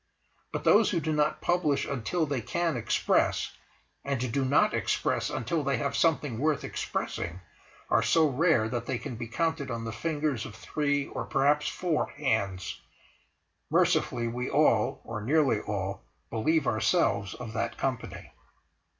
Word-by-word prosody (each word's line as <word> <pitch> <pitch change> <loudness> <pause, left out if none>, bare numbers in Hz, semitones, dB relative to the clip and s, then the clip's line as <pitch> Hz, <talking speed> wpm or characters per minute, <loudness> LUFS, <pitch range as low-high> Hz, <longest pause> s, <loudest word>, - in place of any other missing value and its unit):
But - - -3
those 215 +1 +5
who 175 - +1
do 155 0 -1
not 150 0 +1
publish 150 -6 +1
until 140 +6 -1
they 140 -4 -2
can 170 +5 -1
express, 115 -2 +1 0.5
and 130 -3 -2
do 140 - +1
not 130 +2 +3
express - - 0
until 150 +7 -1
they 140 -2 +1
have - - -2
something 145 -8 +1
worth 150 +1 +1
expressing, 85 +2 -3 0.5
are - - +3
so 160 -2 +4
rare 145 -4 +3
that 120 0 -3
they 130 - -1
can 120 - -6
be 115 0 -5
counted 160 +2 -1
on 115 -1 -4
the 115 - -3
fingers 150 -3 -1
of - - -8
three 145 -2 -1
or - - -4
perhaps 145 +2 +2
four 175 -4 -1
hands; 95 - -1 0.9
mercifully, 120 -1 +2
we 125 +2 -3
all—or 115 -5 +1
nearly 135 -2 +3
all 100 -2 -3 0.3
believe 145 +7 +1
ourselves 110 - +1
of 115 -3 -7
that 115 - -2
company. 130 -3 -4
135 Hz, 150 wpm, -28 LUFS, 115-155 Hz, 0.9 s, those